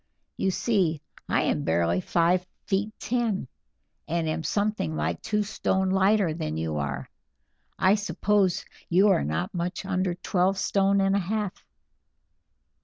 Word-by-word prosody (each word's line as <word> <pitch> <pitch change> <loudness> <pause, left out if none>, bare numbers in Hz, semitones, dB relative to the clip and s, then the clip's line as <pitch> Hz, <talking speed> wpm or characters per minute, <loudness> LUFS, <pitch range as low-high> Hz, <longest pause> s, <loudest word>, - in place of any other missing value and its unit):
You 190 - 0
see, 185 -6 +1 0.3
I - - +2
am 75 - 0
barely 85 +2 +1
five 175 - +2 0.2
feet 205 +2 0
ten, 230 - -1 0.6
and 165 +1 -1
am 160 +1 -1
something 205 - -1
like 80 +2 -2
two 210 -1 0
stone 190 -2 0
lighter 195 -2 +3
than 75 - -3
you 80 -1 -2
are. 70 -2 -3 0.7
I 190 +1 +4
suppose 205 -2 +1 0.2
you 190 +4 +5
are 195 - +3
not 80 +4 -2
much 175 +2 -3
under 185 -2 0
twelve 185 +2 +1
stone 195 0 +2
and 195 0 +2
a - - +3
half." 205 +1 -3
185 Hz, 140 wpm, -26 LUFS, 150-200 Hz, 0.7 s, you